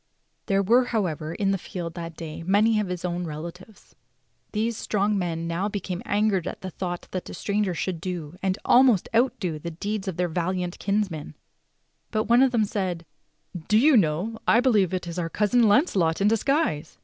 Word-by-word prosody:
There 195 0 +2
were, 240 +6 +4
however, 170 -9 -2
in 195 0 +1
the 195 - 0
field 170 -1 -6
that 170 -1 -7
day 165 -1 -7
many 210 +5 +3
of 210 - -1
his 180 -1 -4
own 175 0 -2
relatives. 170 +7 -9 0.6
These 225 +2 -1
strong 210 0 0
men 170 -3 -2
now 175 +5 -1
became 190 -3 -4
angered 205 -4 +1
at - - -6
the 185 - -6
thought 175 0 -5
that 185 - -5
a - - -7
stranger 200 -3 -1
should 170 -1 -3
do, 175 -3 -5
and 190 -1 0
almost 245 -6 +5
outdo, 200 -10 +1
the 170 - -5
deeds 200 +5 -4
of 185 - -3
their 180 0 +1
val 175 +2 -1
iant 180 -1 -4
kinsman; 195 -7 -2 0.7
but 215 -1 0
one 235 +3 +4
of 265 - +5
them 225 -4 +2
said: 185 -5 -3 0.6
"Do 215 - +4
you 285 +5 +5
know, 195 +4 +1
I 230 - +6
believe 215 -8 +3
it 185 -2 -2
is 170 +1 -5
our 165 -1 -2
cousin 220 +5 +3
Launcelot 200 - +2
in 200 - +3
disguise." 225 - 0
190 Hz, 190 wpm, -25 LUFS, 170-215 Hz, 0.7 s, I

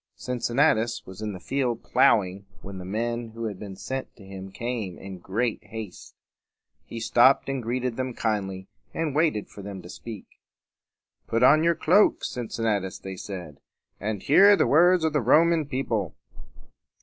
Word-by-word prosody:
Cincinnatus 120 -1 0
was 95 +2 -10
in 105 -1 -3
the 95 - -8
field 125 +2 -2
plowing 95 -1 +2 0.2
when 95 -1 -8
the 90 - -8
men 115 +3 -3
who 115 - -6
had 105 -4 -5
been 100 -2 -8
sent 130 +7 -6
to 100 - -15
him 95 0 -9
came 115 -5 -4
in 95 -1 -9
great 110 +6 -2
haste. 110 -4 -9 0.7
He 115 - -6
stopped 120 +4 +4
and 135 -1 -2
greeted 120 +1 -2
them 130 -2 -3
kindly, 95 -4 -2 0.3
and 160 -3 -1
waited 150 -9 +1
for 100 - -11
them 100 -1 -7
to 90 - -11
speak. 110 +1 -9 1.0
"Put 115 +2 +1
on 155 +5 +6
your 170 0 +3
cloak, 185 +7 +3
Cincinnatus," 110 -5 -2
they 95 0 -8
said, 90 -7 -8 0.4
"and 105 -1 -3
hear 200 +8 +7
the - - +2
words 175 +3 +5
of 160 -1 +1
the 150 - +2
Roman 155 +5 +4
people." 130 -6 -2
115 Hz, 160 wpm, -26 LUFS, 100-130 Hz, 1.0 s, hear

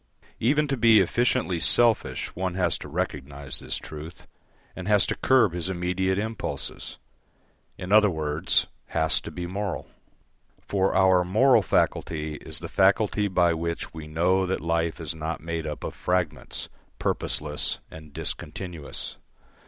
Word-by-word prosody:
Even 145 +6 +2
to 135 - 0
be 115 -3 +6
efficiently 115 -2 +1
selfish 110 - +2
one 90 0 -2
has 90 -3 +2
to - - -8
recognise 70 -4 -2
this - - -3
truth, 80 +3 -9 0.5
and 90 0 -6
has 105 -2 +4
to - - -1
curb 125 -9 +3
his 90 +1 0
immediate 95 +1 0
impulses 110 +2 -4 0.8
in 90 - -6
other 105 0 +6
words, 75 -3 +1 0.2
has - - +2
to - - -7
be 90 - -5
moral. 95 +1 -3 0.7
For 95 -1 0
our 95 -1 +5
moral 110 +7 +4
faculty 75 -3 0
is - - -4
the - - -5
faculty 100 +2 +2
by 90 -3 +3
which 85 +1 -4
we 80 -1 -8
know 90 +4 +2
that 95 - -1
life 85 0 -1
is 80 -1 -2
not 80 +1 -4
made 80 0 -4
up 75 - -5
of - - -4
fragments, 85 -5 -2 0.3
purposeless 75 -1 -1
and 80 -2 -11
discontinuous. 85 +1 -5
90 Hz, 145 wpm, -26 LUFS, 80-100 Hz, 0.8 s, be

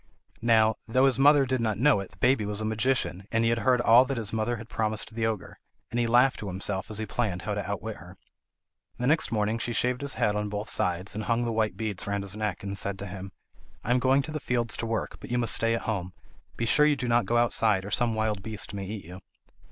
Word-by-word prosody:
Now, 110 -1 +3
though 130 +4 +3
his 135 -3 +3
mother 145 0 +6
did 130 -1 -1
not 110 -3 0
know 135 0 +4
it, 100 - -6
the 95 - -21
baby 125 +1 +2
was 105 0 -2
a 110 - -3
magician 110 -4 -1
and 115 0 +1
he 115 - +3
had 115 - 0
heard 125 +3 +3
all 120 +1 +6
that 135 -1 -3
his 110 -2 -3
mother 110 +2 0
had 115 0 -9
promised 110 -1 -2
the 110 0 0
ogre; 110 -5 -5 0.3
and 120 - -1
he 120 - +1
laughed 125 +3 +4
to 105 - -6
himself 95 +1 -4
as 110 - -3
he 110 - -3
planned 105 -4 -2
how - - -2
to - - -4
outwit - - -4
her. - - -13 0.8
The 125 - -3
next 155 +5 +2
morning 110 0 0
she 120 - -2
shaved 125 +2 0
his 140 0 -1
head 105 - +1
on 105 0 -2
both 105 +1 -3
sides, 90 +2 0
and 105 0 -4
hung 120 0 +1
the 115 - -1
white 110 -4 0
beads 105 -4 -4
round 100 0 -2
his 100 0 +2
neck, 105 -3 -3
and 100 0 -4
said 100 0 -2
to 100 - -6
him: 95 0 -8 0.5
"I 120 - -2
am 125 - +4
going 135 +2 +3
to 155 - -6
the 155 - -3
fields 120 -4 0
to 115 - -3
work, 115 -1 -3
but - - -10
you 120 - 0
must 120 -3 +3
stay 115 0 +3
at - - -3
home. 95 -5 -3 0.4
Be 115 - -1
sure 150 +6 +4
you 150 - +3
do 125 - -4
not 120 0 +2
go 120 - +2
outside, 110 -4 +2
or 100 - -7
some 115 +1 +1
wild 110 -2 -1
beast 110 0 -5
may 100 -1 -5
eat 105 -2 -6
you." 90 +2 -10
110 Hz, 265 wpm, -27 LUFS, 105-120 Hz, 0.8 s, mother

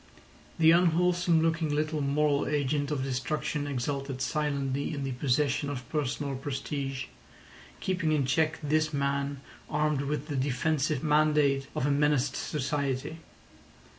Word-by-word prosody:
The 160 0 +6
unwholesome 175 -1 +3
looking 165 -1 +1
little 155 +1 0
moral 145 +1 +1
agent 145 -1 0
of 145 -3 -1
destruction 135 +2 -2
exulted 135 0 -3
silently 140 +1 -1
in 140 - -3
the 135 - -2
possession 140 +2 0
of 130 -4 -5
personal 140 -2 -2
prestige, 135 0 -4 0.7
keeping 180 -4 0
in 150 -3 +2
check 155 +4 +1
this 155 +1 +1
man 140 0 -1 0.3
armed 150 -2 +1
with 145 +1 -2
the 145 - -3
defensive 140 +2 0
mandate 150 -3 +3
of - - 0
a 145 - +2
menaced 145 -2 +2
society. 145 +1 -2
145 Hz, 130 wpm, -29 LUFS, 135-155 Hz, 0.7 s, The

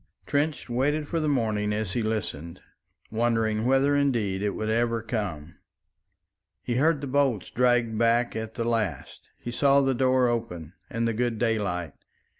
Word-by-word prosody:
Trench 145 +1 -1
waited 145 +5 0
for 165 - -1
the 155 - -1
morning 110 -6 0
as 105 -2 -2
he 120 - 0
listened, 90 -6 -3 0.5
wondering 115 -1 +1
whether 135 +2 +3
indeed 115 -9 +1
it 105 -1 -1
would 110 - -3
ever 115 0 0
come. 90 -9 -4 1.1
He 120 -1 -1
heard 150 +1 +2
the - - -3
bolts 135 -7 0
dragged 120 -2 +2
back 115 0 +2
at 110 0 -5
the 115 - -2
last; 105 - -3
he 120 - -6
saw 140 +3 +4
the 135 -1 +2
door 130 0 +3
open 90 -9 -3 0.2
and 115 0 -1
the 115 - 0
good 120 0 -1
daylight. 100 -9 -1
115 Hz, 160 wpm, -26 LUFS, 105-130 Hz, 1.1 s, saw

